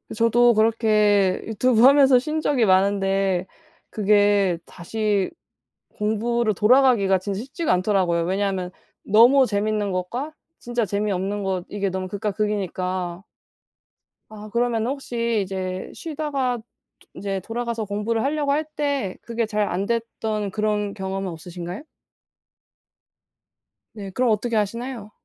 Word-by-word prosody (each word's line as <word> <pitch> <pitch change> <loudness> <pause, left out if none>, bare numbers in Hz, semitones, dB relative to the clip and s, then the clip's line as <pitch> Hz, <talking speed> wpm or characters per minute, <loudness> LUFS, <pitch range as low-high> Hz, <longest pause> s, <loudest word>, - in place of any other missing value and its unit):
저도 235 +1 +4
그렇게 215 -3 +3
유튜브 225 +1 +2
하면서 270 -1 +7
쉰 310 +4 -3
적이 260 -7 +2
많은데 195 -1 +2 0.4
그게 205 -3 +3
다시 205 +2 -2 0.7
공부로 220 +1 0
돌아가기가 215 -3 +4
진짜 195 +1 -4
쉽지가 285 +6 -2
않더라고요. 180 -3 +1
왜냐하면 190 -1 -1 0.3
너무 240 +6 +6
재밌는 210 0 -1
것과 235 +12 -3 0.3
진짜 240 -1 -2
재미없는 200 0 -2
것 185 -2 -2
이게 200 -1 -2
너무 185 0 -4
극과 205 +2 -3
극이니까 185 -3 -2 1.1
아. 215 0 -10
그러면 235 0 0
혹시 235 -5 -1
이제 185 -1 -5
쉬다가 285 -6 -2
도 225 - -13 0.5
인제 195 -1 -3
돌아가서 235 0 -3
공부를 210 +3 -1
하려고 290 0 0
할 305 +2 0
때 280 -10 -1
그게 230 0 -2
잘 210 -1 -1
안 190 +3 -2
됐던 220 -2 -2
그런 210 -1 -1
경험은 190 0 -4
없으신가요? 175 - -7 2.1
네. 200 -3 -7
그럼 245 +4 +1
어떻게 225 +2 0
하시나요? 225 +1 -3
210 Hz, 285 characters per minute, -23 LUFS, 195-235 Hz, 2.1 s, 하면서